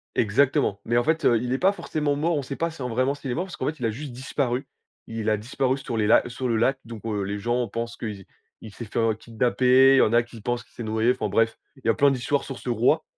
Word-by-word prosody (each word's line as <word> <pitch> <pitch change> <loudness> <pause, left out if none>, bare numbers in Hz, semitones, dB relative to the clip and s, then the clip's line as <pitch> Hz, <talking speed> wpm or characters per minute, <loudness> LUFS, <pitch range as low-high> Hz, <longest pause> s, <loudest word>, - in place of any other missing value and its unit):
Exactement. 110 -3 +2
Mais 120 - +1
en 120 - +3
fait, 160 0 0
heu, 115 -2 +5
il 125 +1 -2
est - - +1
pas 190 +5 +4
forcément 150 -7 -2
mort, 160 +3 0
on 140 - -2
sait 135 +1 -5
pas 165 - -1
si 160 -4 -11
en 125 - -2
vraiment 130 +4 +1
s'il 135 -3 -6
est - - 0
mort, 180 +8 -2
parce 185 - -9
qu'en - - -3
fait, 155 -2 -3
il 120 - -2
a - - +2
juste 140 +4 -7
disparu. 130 +1 -2 0.4
Il 115 -1 -2
a 105 - +2
disparu 130 +4 -1
sur 125 -3 -5
les 105 - +2
la 110 - +6
sur 125 +1 -3
le 115 - +1
lac, 130 +4 +2
donc 115 -2 -9
heu, 105 -3 -1
les 100 +1 -3
gens 120 +3 0
pensent 115 +3 -4
que - - -6
i 100 -3 -6 0.4
il 110 -2 -10
s'est 115 - -7
fait, 110 - -3
heu, 115 -1 +2
kidnapper, 125 +4 +4
il - - +4
y - - +6
en 110 - +3
a 120 - +6
qui 120 -1 -13
pensent 120 +2 -2
qu'il - - -29
s'est 120 - -7
noyé, 110 +2 +2
enfin - - -2
bref, 115 0 +1 0.2
il 135 - -19
y - - +2
a 115 - +5
plein 140 0 +4
d'histoires 135 +2 0
sur 135 -3 -7
ce - - -6
roi, 125 +7 +2
120 Hz, 300 wpm, -25 LUFS, 115-135 Hz, 0.4 s, la